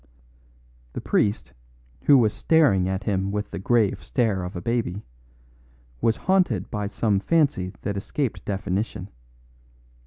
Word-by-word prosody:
The -, -, -4 dB
priest, 105 Hz, +1 st, 0 dB, 0.5 s
who 140 Hz, -, +7 dB
was 110 Hz, -4 st, +3 dB
staring 120 Hz, -, +3 dB
at 95 Hz, 0 st, -2 dB
him 95 Hz, -1 st, -1 dB
with 105 Hz, 0 st, -3 dB
the -, -, -5 dB
grave 110 Hz, 0 st, +1 dB
stare 110 Hz, -7 st, 0 dB
of 90 Hz, +1 st, -6 dB
a -, -, -3 dB
baby, 110 Hz, -3 st, -2 dB, 1.0 s
was 115 Hz, -1 st, +2 dB
haunted 180 Hz, -, +2 dB
by 105 Hz, -1 st, -2 dB
some 100 Hz, -1 st, 0 dB
fancy 135 Hz, -, +1 dB
that 100 Hz, -1 st, -2 dB
escaped 125 Hz, +5 st, -3 dB
definition. 100 Hz, 0 st, -3 dB
105 Hz, 130 wpm, -24 LUFS, 95-120 Hz, 1.0 s, who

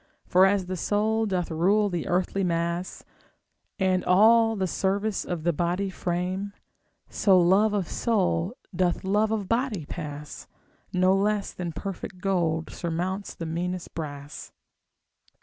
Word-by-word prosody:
For 185 Hz, +1 st, +5 dB
as 195 Hz, -1 st, +1 dB
the 185 Hz, 0 st, -4 dB
soul 215 Hz, +4 st, +1 dB
doth 180 Hz, -4 st, -1 dB
rule 195 Hz, +6 st, +3 dB
the 175 Hz, -5 st, -3 dB
earthly 185 Hz, +2 st, 0 dB
mass, 170 Hz, +1 st, -2 dB, 0.7 s
And 185 Hz, -2 st, +1 dB
all 225 Hz, +4 st, +5 dB
the 190 Hz, -2 st, 0 dB
service 200 Hz, +3 st, -1 dB
of 175 Hz, -3 st, -4 dB
the 175 Hz, 0 st, +2 dB
body 180 Hz, +4 st, -1 dB
frame, 185 Hz, +3 st, -3 dB, 0.5 s
So 190 Hz, -3 st, +4 dB
love 195 Hz, +5 st, +4 dB
of 190 Hz, -5 st, -1 dB
soul 195 Hz, -1 st, 0 dB, 0.2 s
doth 180 Hz, -1 st, +1 dB
love 210 Hz, +3 st, +2 dB
of 215 Hz, -3 st, -2 dB
body 230 Hz, -, -1 dB
pass, 150 Hz, -2 st, -7 dB, 0.4 s
No 185 Hz, +1 st, +3 dB
less 205 Hz, +1 st, 0 dB
than 175 Hz, -2 st, -4 dB
perfect 190 Hz, +2 st, -6 dB
gold 170 Hz, -4 st, 0 dB
surmounts 180 Hz, +4 st, -3 dB
the 165 Hz, -, -6 dB
meanest 175 Hz, +2 st, -4 dB
brass. 145 Hz, -2 st, -7 dB
185 Hz, 135 wpm, -26 LUFS, 175-200 Hz, 0.7 s, For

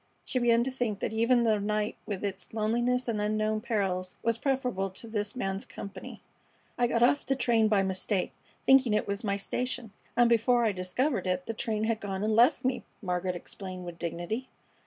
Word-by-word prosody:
She 255 Hz, -, 0 dB
began 235 Hz, -1 st, +4 dB
to 265 Hz, -, -2 dB
think 240 Hz, -6 st, -2 dB
that -, -, -2 dB
even 235 Hz, +2 st, +3 dB
the 220 Hz, -2 st, +3 dB
night 210 Hz, +1 st, -1 dB
with 205 Hz, -3 st, -4 dB
its 200 Hz, -1 st, -4 dB
loneliness 240 Hz, +3 st, +1 dB
and 220 Hz, -3 st, -1 dB
unknown 215 Hz, +1 st, 0 dB
perils 195 Hz, -5 st, -1 dB
was 230 Hz, 0 st, +1 dB
preferable 250 Hz, -8 st, 0 dB
to 195 Hz, +5 st, -8 dB
this 210 Hz, -1 st, -3 dB
man's 195 Hz, -5 st, -2 dB
company. 200 Hz, +1 st, -9 dB, 0.5 s
"I 245 Hz, 0 st, +2 dB
got 235 Hz, 0 st, +2 dB
off 280 Hz, +4 st, +4 dB
the 270 Hz, -, 0 dB
train 235 Hz, -4 st, +3 dB
by 205 Hz, -2 st, +3 dB
mistake, 190 Hz, 0 st, -1 dB, 0.3 s
thinking 260 Hz, -5 st, +5 dB
it -, -, 0 dB
was 200 Hz, +2 st, -2 dB
my 200 Hz, -2 st, 0 dB
station, 245 Hz, +2 st, -2 dB, 0.3 s
and 240 Hz, 0 st, +6 dB
before 235 Hz, +1 st, +3 dB
I 220 Hz, -, +3 dB
discovered 190 Hz, +7 st, -1 dB
it 180 Hz, 0 st, 0 dB
the 225 Hz, -, -3 dB
train 220 Hz, -1 st, -2 dB
had 220 Hz, 0 st, 0 dB
gone 195 Hz, -2 st, -3 dB
and 215 Hz, 0 st, +1 dB
left 245 Hz, +2 st, +5 dB
me," 260 Hz, -, 0 dB, 0.2 s
Margaret 180 Hz, -2 st, -1 dB
explained, 185 Hz, 0 st, -7 dB
with 175 Hz, -1 st, -8 dB
dignity. 175 Hz, +9 st, -3 dB
215 Hz, 195 wpm, -29 LUFS, 195-240 Hz, 0.5 s, and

